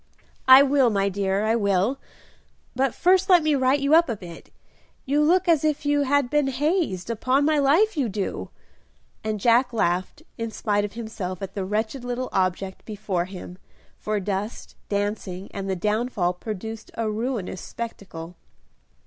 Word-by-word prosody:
"I 260 +1 +10
will, 275 -3 +3
my 200 -2 +1
dear, 195 +1 -1
I 220 +1 +2
will; 200 +4 +1 0.8
but 265 0 0
first 375 +2 +3
let 355 -3 +6
me 310 -1 +2
right 265 +1 +2
you 280 +2 +1
up 330 -2 +6
a 230 - -1
bit; 175 -4 -11 0.6
you 285 +3 +2
look 355 +5 +3
as 325 -4 +4
if 300 -1 0
you 290 0 +2
had 285 -1 +2
been 295 +1 +1
hazed, 270 - -1
upon 255 +5 +1
my 305 -1 +3
life 335 +11 +3
you 270 -7 0
do;" 200 0 -4 0.7
and 215 -1 -2
Jack 240 +4 +3
laughed 185 - -1 0.2
in 230 0 -2
spite 205 -2 -1
of 205 -1 -4
himself 205 -5 -5
at 195 - -6
the 195 -2 -3
wretched 220 +6 -2
little 245 +1 -3
object 190 0 -1
before 200 -5 -3
him, 180 -1 -10 0.4
for 215 -1 -1
dust, 200 +3 -4
dancing, 200 -2 -3
and 195 -1 -4
the 190 - 0
downfall 210 -2 0
produced 215 +3 -7
a 225 -1 -1
ruinous 215 -3 -3
spectacle. 180 -7 -7
225 Hz, 165 wpm, -24 LUFS, 195-275 Hz, 0.8 s, I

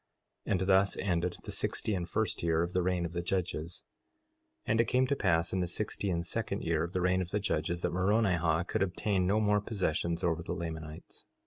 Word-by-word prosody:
4:17 - - -2
And 95 - +1
thus 95 +1 +3
ended 90 -2 0
the - - -6
sixty 110 - -1
and 90 -3 -2
first 110 +2 -1
year 80 0 +2
of 85 - -4
the 90 - +2
reign 90 -1 0
of 85 - -4
the 85 - -1
judges. 90 -2 -3 0.8
4:18 - - -1
And 110 +1 +4
it - - +1
came 130 +3 +3
to 140 - +1
pass 85 -8 +1
in 95 - +1
the 90 - 0
sixty 100 +2 -2
and 85 -1 -1
second - - -3
year 80 -1 +1
of 85 - -5
the 90 - 0
reign 90 +1 +2
of 90 - -4
the 105 - 0
judges, 85 -3 -1
that - - 0
Moronihah 90 -4 +2
could - - -1
obtain 95 0 +1
no 105 +3 +3
more 105 -1 +3
possessions 85 -4 -1
over 85 -1 +1
the 85 - -4
Lamanites. 80 -2 -7
90 Hz, 225 wpm, -31 LUFS, 85-100 Hz, 0.8 s, And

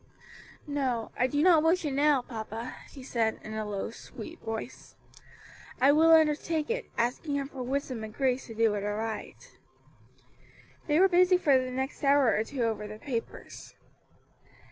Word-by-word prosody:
"No, 265 -6 -2
I 255 - +2
do 290 +3 0
not 340 -4 +6
wish 330 +2 +2
it 290 - -1
now, 285 -2 +3
papa," 225 0 -6 0.2
she 270 - -11
said, 225 -3 -1
in 215 - -7
a 220 0 -3
low, 200 +1 -4
sweet 225 -1 -10
voice. 225 +2 -7 0.8
"I 270 +3 +6
will 320 +2 +5
undertake 315 +1 +3
it, - - -3
asking 250 +5 -1
Him 280 -1 -2
for 265 - -8
wisdom 255 -2 -3
and 215 - -7
grace 260 +2 -1
to 225 - -9
do 225 -1 +3
it 205 -1 -3
aright." 215 +1 -5 1.3
They 300 +1 +3
were 380 - +7
busy 365 0 +4
for 295 -6 +3
the 255 - -5
next 265 +3 -4
hour 280 -4 +4
or 215 - +1
two 250 +1 -4
over 220 -2 -2
the 215 0 -8
papers. 235 -1 -7
260 Hz, 165 wpm, -29 LUFS, 225-295 Hz, 1.3 s, were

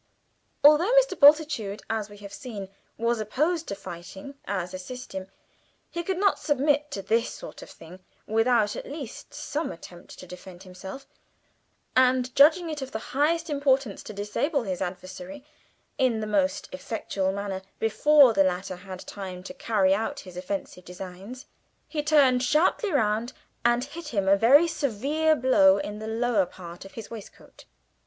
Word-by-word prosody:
Although 305 +8 +6
Mr. - - +4
Bultitude, 285 -9 +4
as 220 -2 -2
we 205 - -13
have 200 -1 -11
seen, 205 -5 -7 0.3
was 230 0 0
opposed 310 - -1
to 200 - -3
fighting 190 +6 -9
as 185 -2 -3
a 185 - -5
system 190 -2 -7 0.6
he 340 - -3
could 370 +2 -2
not 400 +1 +2
submit 290 +1 +1
to 200 -8 -5
this 230 +4 +1
sort - - -10
of - - -11
thing 170 +3 -13 0.3
without 225 -1 +2
at - - -7
least 280 -5 -8
some 305 +3 -3
attempt 175 +1 -12
to - - -10
defend 180 0 -11
himself; 190 +8 -9 0.9
and 255 0 +3
judging 330 +5 +6
it 305 -3 -4
of 265 0 -6
the - - -1 0.2
highest 325 +5 +1
importance 275 -6 +1
to - - -9
disable 215 +8 -1
his 185 -4 -4
adversary 190 +11 -6 0.5
in 250 -4 +2
the 215 - -3
most 195 -3 0
effectual 190 0 -3
manner 195 -1 -4 0.2
before 275 +3 +5
the 195 - +4
latter 185 0 -2
had 185 0 -9
time 185 -2 -7
to 195 - -8
carry 210 -8 +2
out 225 +8 -2
his 185 -2 -12
offensive 180 0 -5
designs, 190 - -9 0.4
he 305 - -2
turned 285 -5 +4
sharply 320 - +2
round 230 -2 0 0.3
and 240 +1 +3
hit 300 +4 -8
him 200 -8 -1
a 195 - +6
very 270 +11 +6
severe 300 +3 +1
blow 200 -8 +5
in 205 +1 -5
the 220 - -6
lower 225 -4 +1
part 175 0 -11
of 195 - -12
his 225 -1 -9
waistcoat. 220 -3 -12
225 Hz, 160 wpm, -26 LUFS, 195-285 Hz, 0.9 s, Although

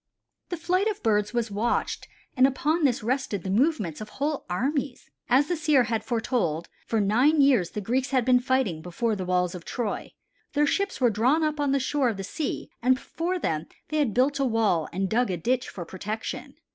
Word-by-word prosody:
The 350 - -3
flight 365 +5 +1
of 420 -2 -3
birds 210 -2 +2
was 235 -2 -1
watched 215 +4 -1 0.3
and 260 0 +6
upon 300 +4 +1
this 250 -3 +1
rested 245 -4 -1
often 190 +2 -2
the 225 - +4
movements 220 - 0
of 215 - -7
whole 290 +1 -2
armies. 270 - -2 0.2
As 265 +4 +4
the 355 - 0
seer 305 -5 +3
had 225 -2 -2
foretold 220 - -1 0.2
for 225 - +1
nine 245 +10 +3
years 265 -11 +4
the 210 - -5
Greeks 255 +6 0
had 255 -4 +1
been 250 -1 +5
fighting 250 -10 0
before 210 +7 -1
the 190 -2 -4
walls 180 -1 +1
of 180 -2 -8
Troy; 225 +1 -4 0.4
their 295 0 +3
ships 395 +6 0
were 245 -3 +4
drawn 255 +10 +2
up 305 -1 -1
on 285 -2 +1
the 275 - +2
shore 270 -1 +1
of 220 - -3
the 195 - -4
sea 285 - -4
and 255 +2 +4
before 335 +7 -3
them 160 - -2 0.2
they 310 - -1
had 275 -9 +1
built 275 +3 +2
a - - +2
wall 220 - +1
and 190 +2 -1
dug 235 +4 +1
a 180 - -1
ditch 250 +8 0
for 175 -3 -7
protection. 210 +5 -5
245 Hz, 210 wpm, -26 LUFS, 205-285 Hz, 0.4 s, and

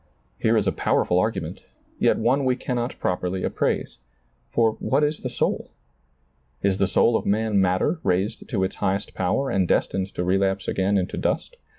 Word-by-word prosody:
Here 115 0 +3
is 105 - +1
a 95 - +2
powerful - - +1
argument, - - -2 0.4
yet - - +3
one 130 +5 +2
we 130 -1 +2
cannot 125 -1 -3
properly 90 +1 -2
appraise. - - -1 0.5
For 115 - +3
what 150 - +1
is 150 +1 0
the 125 - -4
soul? 120 - -1 0.9
Is 100 -1 +1
the 100 - +3
soul 115 +4 +3
of - - -1
man 105 -1 +2
matter 95 - +1
raised 95 +2 -1
to 100 -7 0
its 95 - -2
highest 95 +1 -1
power 135 +9 0
and 95 -2 +1
destined 95 +2 +1
to 90 - -1
relapse 95 +1 +1
again 100 +1 +1
into 90 -1 -2
dust - - -1
100 Hz, 175 wpm, -24 LUFS, 95-120 Hz, 0.9 s, Here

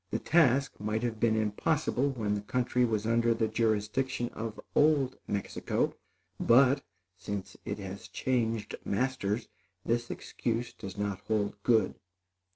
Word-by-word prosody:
The - - 0
task 140 -4 +3
might 110 +2 -1
have 115 -2 -2
been 110 -1 +3
impossible 120 +5 +1
when 110 -6 -1
the 105 - -1
country 125 +3 +1
was 110 -2 -1
under 115 0 +3
the 115 -1 +1
jurisdiction 115 +3 0
of 115 -1 -6
old 145 -4 +4
Mexico; 100 -1 -1 0.5
but, 135 +3 +5 0.4
since 100 -2 -5
it 100 - -3
has 100 -1 -7
changed 115 -4 -1
masters, 115 -1 -1 0.4
this 120 +1 0
excuse 120 +1 -3
does 100 -2 -8
not 100 -1 -2
hold 105 -1 0
good. 110 -3 +3
115 Hz, 135 wpm, -30 LUFS, 105-125 Hz, 0.5 s, but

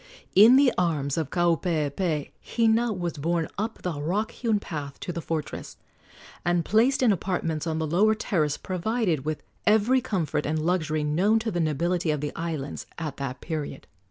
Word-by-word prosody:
In 220 +6 +8
the 270 -1 +5
arms 150 -6 0
of 160 -4 -2
Kaupeepee 165 -2 0
Hina 230 0 +2
was 175 -5 -3
borne 165 +2 0
up 220 +2 -3
the 160 -5 -3
rock 195 +8 -1
hewn 225 -4 0
path 145 -7 -6
to 175 - -4
the 170 - -4
fortress, 160 -1 -4 0.7
and 175 -1 +1
placed 240 +6 +3
in 235 - +5
apartments 170 -4 -1
on 160 -1 -1
the 160 - -1
lower 200 +8 +3
terrace 155 -9 0
provided 185 - -1
with 155 0 -3 0.2
every 220 +5 +4
comfort 180 - -1
and 155 +1 0
luxury 155 -2 0
known 180 +9 +3
to 225 0 -1
the 175 - -2
nobility 170 +2 0
of 150 -1 +1
the 150 +1 -3
islands 160 -4 -4
at 155 -4 -4
that 135 -2 -5
period. 150 -4 -5
170 Hz, 170 wpm, -26 LUFS, 155-210 Hz, 0.7 s, In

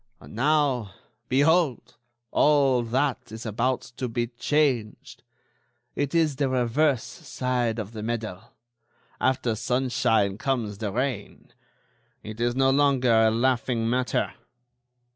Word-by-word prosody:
And - - -14
now, 130 -5 +1 0.3
behold, 145 +1 +2 0.4
all 140 -4 +3
that 125 0 -1
is 110 +2 -8
about 120 +4 0 0.2
to 130 -1 -2
be 120 +1 -1
changed! 120 -1 -1 0.7
It 145 +3 -2
is 155 -5 +2
the 140 -2 +1
reverse 130 +1 +1
side 125 -7 -3
of 110 -2 -5
the 110 -2 -7
medal. 110 -4 -4 0.8
After 125 -3 +1
sunshine 120 -4 0
comes 120 -8 -2
the 105 -3 -3
rain. 125 -2 -4 0.7
It 110 +2 -8
is 120 0 +1
no 135 0 +3
longer 135 -3 +3
a 110 0 +5
laughing 120 0 0
matter. 125 +2 0
125 Hz, 120 wpm, -25 LUFS, 115-135 Hz, 0.8 s, a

